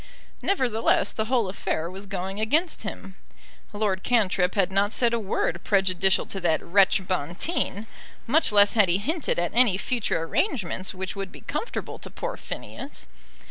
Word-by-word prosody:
Nevertheless, 245 - +1
the 220 - -1
whole 235 -3 +1
affair 170 -3 -2
was 190 +3 -7
going 195 +1 -4
against 305 +10 +1
him. 195 -2 -7 0.5
Lord 205 -3 -1
Cantrip 195 -6 +2
had 195 -2 +2
not 200 +2 +1
said 235 -2 +2
a 235 - +1
word 185 -4 -1
prejudicial 190 -1 +2
to 195 - -5
that 165 -3 +1
wretch 195 +1 +3
Bonteen; 185 - -2 0.4
much 300 +4 +3
less 205 -1 +5
had 210 -5 +4
he 175 - +4
hinted 305 - -1
at 175 0 0
any 235 -5 +4
future 220 -6 -1
arrangements 190 - -2
which 190 +1 -4
would 195 -1 -5
be - - -12
comfortable 470 - -4
to - - -7
poor - - -5
Phineas. 275 - -7
200 Hz, 160 wpm, -25 LUFS, 185-235 Hz, 0.5 s, less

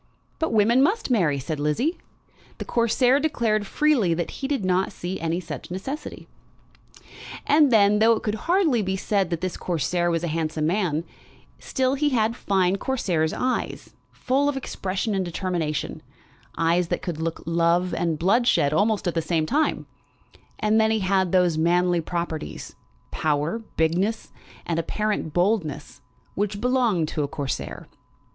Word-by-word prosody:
"But 320 - 0
women 225 +3 +4
must 390 - +1
marry," 170 - +2
said 145 +3 -4
Lizzie. 230 - 0 0.6
The - - -6
Corsair 245 +3 +2
declared 230 -9 0
freely 250 - +2
that 170 0 -3
he 270 - -5
did 275 -9 -1
not 185 +1 +1
see 180 +2 -5
any 165 +1 -1
such 185 - -7
necessity. 265 - -6 1.2
And 295 -2 +4
then, 210 -2 +5
though 225 +1 +5
it 220 - -3
could 210 - -1 0.2
hardly 335 - +3
be 190 -1 -1
said 195 -2 0
that 170 -2 -3
this 185 -2 -3
Corsair 175 +1 -1
was 165 -1 -1
a - - 0
handsome 155 -1 -1
man, 170 -3 0 0.6
still 260 0 0
he 290 +2 +1
had 230 -3 +1
fine 190 -4 +1
Corsair's 180 -11 0
eyes, 255 0 -3 0.2
full 275 +3 0
of 280 - -2
expression 195 -4 -3
and 190 -1 0
determination, 170 -4 -3 0.6
eyes 170 +1 +2
that - - -3
could 165 -4 -4
look 165 0 -3
love 170 +2 +1
and 165 -2 -1
bloodshed 190 - +3
almost 205 +3 +1
at 175 - 0
the 165 - 0
same 160 -1 0
time; 300 - 0 0.7
and 215 +1 +2
then 220 - +3
he 220 -1 +1
had 190 -1 +1
those 180 -4 +3
manly 175 +1 +2
properties, 170 -1 -5 0.4
power, 155 +6 0 0.2
bigness, 180 +8 0 0.3
and 165 -1 -1
apparent 210 -1 -2
boldness, 175 -5 -1 0.3
which 205 0 -2
belong 240 -8 +2
to 155 - -3
a 145 - 0
Corsair. 140 -1 -5
190 Hz, 155 wpm, -24 LUFS, 165-230 Hz, 1.2 s, then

